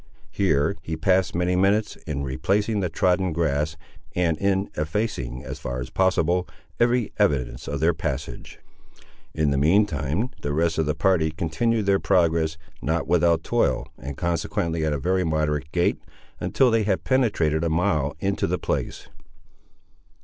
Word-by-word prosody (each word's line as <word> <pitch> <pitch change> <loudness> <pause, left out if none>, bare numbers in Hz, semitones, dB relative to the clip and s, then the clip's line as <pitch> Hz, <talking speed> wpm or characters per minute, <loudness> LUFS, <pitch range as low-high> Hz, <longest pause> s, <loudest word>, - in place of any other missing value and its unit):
Here 95 -1 +1
he 80 -1 -4
passed 95 +2 +2
many 90 +1 +1
minutes 100 +3 +2
in 70 -2 -2
replacing 100 - 0
the 90 -3 -1
trodden 90 +2 +1
grass, 80 -1 0 0.4
and 85 -3 +2
in 100 0 0
effacing, 75 - -2
as - - -6
far 60 +1 -4
as 60 - -6
possible, 90 -1 +2 0.3
every 120 -1 +2
evidence 65 -3 0
of 70 -1 -3
their 85 +2 +4
passage. 70 -6 -5 0.8
In 75 -2 +1
the 70 - +1
mean 90 +9 +4
time 80 - -2
the 70 - -2
rest 80 +1 +1
of 80 - +1
the 75 - 0
party 80 -2 +2
continued 90 +8 -1
their 100 0 +3
progress, 85 -4 +2 0.2
not 80 +3 -1
without 85 -1 +3
toil, - - 0
and 70 +1 -7
consequently 85 -1 -1
at 80 - +1
a 75 - 0
very 90 +7 +1
moderate 75 -3 -1
gait, 85 0 +1 0.4
until 130 -3 +2
they 115 0 +3
had 100 -3 0
penetrated 95 - +1
a 85 - +1
mile 80 -4 +1
into 100 +2 0
the - - 0
place. - - -3
85 Hz, 155 wpm, -24 LUFS, 75-95 Hz, 0.8 s, their